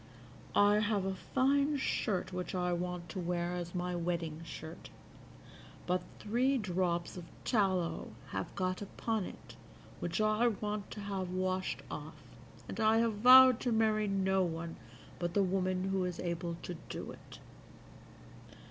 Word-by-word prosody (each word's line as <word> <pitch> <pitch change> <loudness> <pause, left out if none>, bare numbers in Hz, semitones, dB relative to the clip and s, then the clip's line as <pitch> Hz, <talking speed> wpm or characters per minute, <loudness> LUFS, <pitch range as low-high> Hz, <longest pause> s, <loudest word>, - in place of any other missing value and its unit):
"I 205 +1 +6
have 205 -2 +1
a 195 - 0
fine 280 +8 +2
shirt 195 -8 -1
which 180 +1 -3
I 180 -1 +1
want 175 0 -3
to 190 - -5
wear 175 0 -1
as 175 0 -4
my 180 0 -1
wedding 165 -2 -2
shirt, 160 0 -8 1.0
but 180 0 +1 0.2
three 250 +6 +1
drops 180 -5 -1
of 175 - -7 0.2
tallow 190 -7 +1 0.2
have - - -4
got 185 0 -1
upon 215 0 -2
it - - -11 0.4
which 175 +2 -2
I 215 +2 +3
want 210 -2 -2
to 210 - -7
have 195 -2 -3
washed 185 0 -1
off, - - -6 0.5
and - - -6
I 220 0 +4
have 230 -1 +3
vowed 255 +2 +9
to 245 - -1
marry 215 -1 +2
no 190 -1 +2
one 165 -1 -2 0.4
but 175 0 -2
the 200 - +4
woman 185 0 0
who 190 -1 +1
is 180 -1 -4
able 170 -1 -2
to 175 - -5
do - - -5
it. - - -13
185 Hz, 150 wpm, -33 LUFS, 175-215 Hz, 1.0 s, vowed